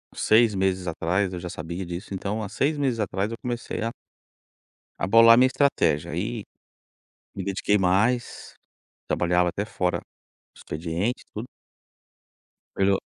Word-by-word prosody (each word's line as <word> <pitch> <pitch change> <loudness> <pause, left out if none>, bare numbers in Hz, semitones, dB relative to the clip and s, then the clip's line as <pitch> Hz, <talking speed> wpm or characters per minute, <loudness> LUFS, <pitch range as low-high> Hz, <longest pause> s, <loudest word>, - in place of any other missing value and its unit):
Seis 110 -1 +4
meses 95 -1 0
atrás, 90 +4 0
eu 90 - -4
já 90 0 -6
sabia 85 +4 -5
disso, 90 +3 -6
então, 100 +3 -3
há 105 - -5
seis 145 +8 0
meses 130 -5 0
atrás 100 0 -1
eu 115 - -5
comecei 120 -2 -4
a 115 - -1 1.1
a 85 - +1
bolar 115 +3 +8
a - - +2
minha 130 +1 +6
estratégia. 130 - +1
Aí - - -3 0.9
me 100 - -4
dediquei 100 +1 +1
mais, 105 +6 0 0.5
trabalhava 90 0 +2
até 100 +3 -3
fora 90 -4 -1
do - - -21
expediente 85 +9 -3
e - - -61
tudo. 110 +4 -5 1.3
Pelo. 95 0 +2
100 Hz, 145 wpm, -25 LUFS, 90-115 Hz, 1.3 s, bolar